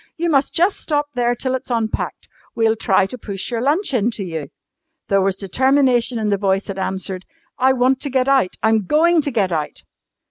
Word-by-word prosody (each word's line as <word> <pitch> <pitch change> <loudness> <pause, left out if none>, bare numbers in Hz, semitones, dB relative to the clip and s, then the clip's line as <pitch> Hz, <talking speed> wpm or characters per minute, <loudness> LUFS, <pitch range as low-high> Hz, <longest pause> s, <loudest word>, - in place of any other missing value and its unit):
You 340 0 0
must 275 -1 +2
just 360 +4 +2
stop 295 -1 -1
there 245 -1 +1
till 260 +2 -2
it's 260 - -4
unpacked. 225 -3 -2 0.3
We'll 225 -1 +2
try 195 -3 +2
to 250 +6 -8
push 200 +1 -6
your 230 -1 -1
lunch 300 - +1
in 230 -2 +2
to 200 - -4
you." 160 -5 -5 0.6
There 195 -1 +3
was 190 0 +1
determination 250 +4 +2
in 215 -2 -1
the 200 - +2
voice 195 -1 +1
that 195 -1 -6
answered, 190 0 -4 0.4
"I 260 +1 +4
want 255 +1 +2
to 285 - -3
get 260 0 +1
out! 270 -9 +2
I'm 220 -3 +2
going 330 - +4
to 290 - -2
get 205 -8 0
out!" 155 -3 -3
235 Hz, 205 wpm, -19 LUFS, 195-270 Hz, 0.6 s, I